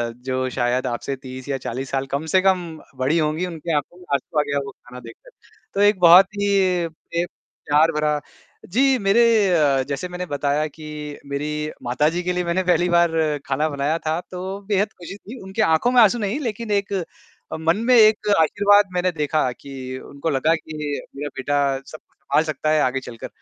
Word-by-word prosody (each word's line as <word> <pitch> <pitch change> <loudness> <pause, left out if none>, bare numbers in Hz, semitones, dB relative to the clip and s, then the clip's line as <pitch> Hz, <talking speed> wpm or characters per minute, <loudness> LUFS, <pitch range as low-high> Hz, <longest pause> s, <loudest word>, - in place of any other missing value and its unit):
जो 130 +1 -3
शायद 125 +1 0
आपसे 125 +3 -3
30 130 0 -10
या 135 - 0
40 130 +1 -5
साल 135 0 -1
कम 140 +3 -1
से 185 - +6
कम 185 -2 +2 0.3
बड़ी 140 +6 +2
होंगी, 155 +3 0
उनकी 165 -1 -5
आँखों 145 +4 -3
में 180 - -15
आँसू 145 +3 -1
आ - - +5
गया 140 0 0
वो 135 - -7
खाना 125 0 -13
देख 115 -1 -11
कर, - - -14 0.4
तो 200 - 0
एक 205 -2 +4
बहुत 180 +2 +8
ही 205 - +1 0.7
एक 175 - -2 0.4
प्यार 155 +3 +4
भरा 150 -1 0 0.5
जी, 260 +7 +2
मेरे 205 +2 +3 0.3
अ, 140 -4 +3
जैसे 140 +5 -3
मैंने 180 0 -5
बताया 145 -1 -1
कि 150 -1 -8
मेरी 150 +2 -3
माताजी 150 +8 0
के 180 +1 -1
लिए 180 0 -1
मैंने 175 +2 0
पहली 175 0 +2
बार 170 -1 +4 0.3
खाना 145 +3 0
बनाया 145 +2 -1
था 160 +2 0
तो 190 +2 -5
बेहद 205 0 0
खुशी 180 +2 -9
थी, 235 +5 -11
उनके 190 +3 -3
आँखों 185 +5 +3
में 250 - +6
आँसू 220 +1 +5
नहीं 210 +6 -2
लेकिन 230 -4 -4
एक 200 0 0 0.7
मन 165 +4 +2
में 255 - +5
एक 215 -1 +5
आशीर्वाद 205 +4 +4
मैंने 180 0 +1
देखा 150 -4 0
कि 140 +3 -12 0.3
उनको 140 +4 -4
लगा 150 +3 +2
कि 160 -1 -9 0.4
मेरा 145 +1 -4
बेटा 145 +2 -1 0.3
सब 155 - -8
कुछ - - -40
सँभाल 155 - +2
सकता 155 -1 -2
है 155 - +3
आगे 130 +1 +1
चलकर, 120 -3 -9
160 Hz, 195 wpm, -22 LUFS, 140-185 Hz, 0.7 s, बहुत